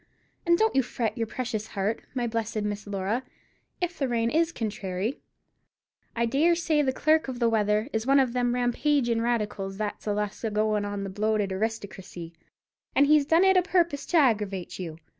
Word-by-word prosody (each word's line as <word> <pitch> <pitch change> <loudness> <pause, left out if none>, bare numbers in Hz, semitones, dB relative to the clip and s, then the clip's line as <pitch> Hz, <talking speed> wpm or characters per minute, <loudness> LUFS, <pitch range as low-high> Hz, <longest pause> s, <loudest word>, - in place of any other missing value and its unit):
And 340 0 +5
don't 440 +3 +2
you 270 - +5
fret 235 -2 -3
your 230 -2 -2
precious 220 -2 -4
heart, 205 +2 -2
my 245 -2 0
blessed 225 -2 -2
Miss 205 0 -4
Laura, 200 +4 -1 0.6
if 350 -2 -3
the 275 - +1
rain 230 -1 0
is 330 +1 +2
contrairy. 210 - -3 1.0
I 235 0 +1
dare 295 +9 +3
say 320 -3 +1
the 265 -2 +1
clerk 310 +3 +2
of 260 -2 -4
the 235 -1 +2
weather 215 0 +1
is 220 +2 -1
one 275 +1 +5
of 255 -3 +2
them 245 -1 +1
rampagin' 245 -1 +1
radicals 210 -5 -2
that's 210 0 -4
allus 210 0 -2
a 225 - 0
goin' 215 0 0
on 205 0 -4
about - - -3
the 195 - -4
bloated 210 0 0
aristocracy, 190 -5 -5 0.6
and 280 - +6
he's 295 -1 +4
done 330 +3 +5
it 380 0 +5
a - - +6
purpose 340 -5 0
to 350 - +2
aggeravate 210 - +1
you. 165 -4 -6
230 Hz, 190 wpm, -27 LUFS, 210-275 Hz, 1.0 s, and